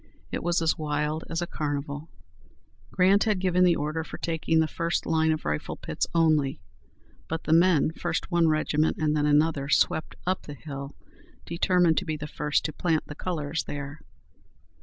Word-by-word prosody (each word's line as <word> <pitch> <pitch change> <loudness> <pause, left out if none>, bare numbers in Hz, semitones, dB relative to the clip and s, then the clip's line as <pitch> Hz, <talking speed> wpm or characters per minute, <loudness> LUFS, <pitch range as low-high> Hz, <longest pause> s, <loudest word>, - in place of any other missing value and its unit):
It - - -2
was 170 0 +1
as 160 - +1
wild 150 +1 -1
as 165 +1 -1
a - - -1
carnival." 145 -1 -4 0.8
Grant 190 +2 +4
had 215 -3 +2
given 180 -1 +2
the 175 -2 +5
order 155 +2 -2
for - - -8
taking 165 -1 0
the 160 - +3
first 170 +2 -2
line 160 0 +2
of 155 - -2
rifle 75 0 -2
pits - - -3
only, 155 -6 +3 0.7
but 160 0 -3
the 155 - +1
men, 165 -3 +4
first 170 +2 -3
one 170 -1 +4
regiment 155 0 +1
and 155 -1 +1
then 150 -1 +2
another, 150 -1 +2
swept 155 - +2
up 185 +1 0
the 145 - -7
hill, 140 0 -7 0.5
determined 170 -1 +2
to 190 - -7
be 155 -2 -2
the 150 - -6
first 150 -1 -1
to 155 - -2
plant 165 -3 0
the - - -8
colors 155 -2 -3
there. 145 +1 -6
160 Hz, 180 wpm, -27 LUFS, 150-170 Hz, 0.8 s, the